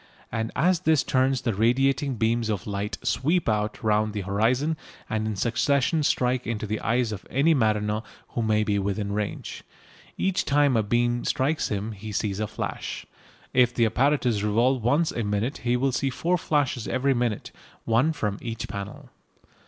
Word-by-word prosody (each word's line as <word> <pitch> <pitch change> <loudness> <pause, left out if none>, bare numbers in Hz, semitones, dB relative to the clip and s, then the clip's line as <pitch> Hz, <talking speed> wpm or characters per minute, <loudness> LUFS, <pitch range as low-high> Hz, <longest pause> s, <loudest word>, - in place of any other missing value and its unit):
And 110 0 -2
as 175 +3 +3
this 160 -4 +3
turns 130 0 +1
the 115 -4 0
radiating 135 +6 +2
beams 115 0 0
of 105 -3 -2
light 105 +1 -3
sweep 165 +5 +1
round 105 0 0
the 105 - -2
horizon 115 - +1 0.3
and 110 0 -1
in 110 - -2
succession 140 - +1
strike 125 -3 +1
into 110 -2 -2
the 105 +1 -2
eyes 120 -1 0
of 100 -2 -6
any 145 +6 +3
mariner 105 -4 +1 0.3
who 120 - -3
may 110 -1 +2
be 105 -1 0
within 100 +1 -2
range. 105 0 -4 0.5
Each 190 -1 +1
time 145 -2 +3
a 110 - +4
beam 120 +3 +1
strikes 150 +4 0
him 105 +1 -3
he 105 +1 -8
sees 100 -1 -2
a 110 - -1
flash. - - -5 0.5
If 125 -1 +4
the 115 - +3
apparatus 125 -2 +2
revolve 115 +4 +2
once 145 +8 +2
a 115 - -2
minute 105 +5 -1
he 120 +2 +1
will 135 +2 +1
see 135 +2 0
four 175 +7 0
flashes 145 -7 0
every 135 +1 +1
minute, 120 -4 -2 0.3
one 120 +7 +3
from 105 -9 -3
each 115 -1 -5
panel. 100 -1 -7
115 Hz, 170 wpm, -25 LUFS, 105-135 Hz, 0.5 s, a